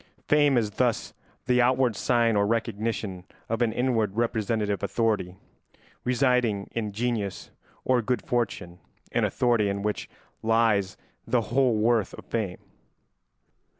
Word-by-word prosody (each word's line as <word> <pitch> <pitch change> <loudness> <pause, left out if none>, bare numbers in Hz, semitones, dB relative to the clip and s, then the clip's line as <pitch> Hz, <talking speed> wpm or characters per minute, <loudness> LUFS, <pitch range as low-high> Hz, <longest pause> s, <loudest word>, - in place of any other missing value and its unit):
Fame 145 -3 +4
is 110 -3 +1
thus - - 0 0.3
the 125 0 +3
outward 125 -2 +2
sign 115 +1 +2
or 100 0 +2
recognition 110 -4 -2 0.2
of 115 +1 -2
an 115 -2 +2
inward 115 -4 0
representative 110 -3 0
authority 105 -4 0 0.7
residing 125 -5 +1
in 110 -3 -3
genius 110 -3 -3 0.3
or 125 -1 +3
good 125 +2 -1
fortune, 100 -7 -2 0.3
an - - +2
authority 120 -5 +2
in 100 0 -3
which 105 0 -2 0.3
lies 110 -4 +2 0.3
the 125 - +2
whole 125 +1 +2
worth 110 0 +1
of - - -12
fame. 105 -6 -2
115 Hz, 125 wpm, -26 LUFS, 105-120 Hz, 0.7 s, Fame